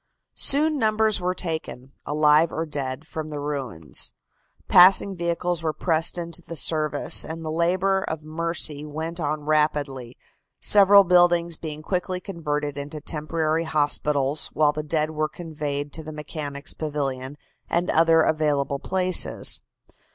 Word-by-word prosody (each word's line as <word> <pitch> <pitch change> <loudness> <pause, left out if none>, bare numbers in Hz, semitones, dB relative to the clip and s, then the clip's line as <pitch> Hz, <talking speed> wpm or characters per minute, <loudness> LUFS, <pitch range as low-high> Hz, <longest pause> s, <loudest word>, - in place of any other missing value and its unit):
Soon 300 +1 +5
numbers 220 -3 +1
were 180 +1 -2
taken, 160 -7 -5 0.2
alive 150 +2 +3
or 160 - -3
dead, 140 -1 -5
from 155 -1 -7
the 150 -1 -6
ruins, 130 - -4 0.6
passing 190 +2 +6
vehicles 170 0 -2
were 160 -1 -2
pressed 165 +2 0
into 170 0 -5
the 170 - -9
service, 155 -2 +3
and 165 0 -8
the 155 - -4
labor 185 +4 0
of 160 -1 -6
mercy 155 -2 0
went 160 +3 -6
on 150 -1 -3
rapidly, 145 -5 -1 0.4
several 200 -1 +6
buildings 175 -2 +3
being 155 -1 -8
quickly 180 +1 -3
converted 150 -6 -5
into 145 +2 -7
temporary 155 +2 -1
hospitals, 145 -2 +1
while 150 -1 +2
the 155 - -4
dead 155 0 -2
were 155 0 -2
conveyed 145 -4 -6
to 160 - -3
the 155 - -8
Mechanics' 150 -1 -6
Pavilion 140 -3 -5 0.3
and 175 +1 -1
other 165 0 +4
available 145 -3 -1
places. 185 +1 +2
155 Hz, 135 wpm, -23 LUFS, 150-170 Hz, 0.6 s, passing